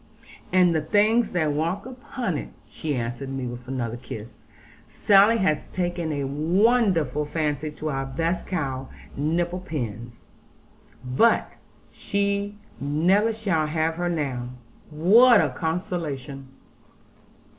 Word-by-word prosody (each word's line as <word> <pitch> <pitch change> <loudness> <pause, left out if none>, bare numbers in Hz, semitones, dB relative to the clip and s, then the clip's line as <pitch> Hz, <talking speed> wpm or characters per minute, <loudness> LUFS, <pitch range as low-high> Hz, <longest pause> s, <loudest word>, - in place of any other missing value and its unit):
'And 180 -2 +4
the 160 - +1
things 210 +8 +3
that 160 -4 0
walk 170 +8 -1
upon 255 - -4
it,' - - -5 0.2
she 150 -3 -4
answered 120 +2 -4
me 135 -1 -4
with 120 0 -7
another 120 -3 -3
kiss; 115 -2 -9 0.4
'Sally 205 - +5
has 185 -8 0
taken 175 -3 -2
a 145 -2 -2
wonderful 165 - +2
fancy 150 -1 -2
to 150 +1 -6
our 135 -1 -2
best 165 +6 -2
cow, 135 -7 -3 0.3
"Nipple 170 +5 -1
pins." 120 - -6 0.8
But 130 - +3 0.4
she 200 0 -2 0.2
never 175 - +2
shall 195 -8 0
have 160 +1 -1
her 175 0 -1
now; 135 -7 -2 0.4
what 210 +10 +6
a - - +2
consolation!' 155 -6 -4
160 Hz, 120 wpm, -25 LUFS, 135-190 Hz, 0.8 s, what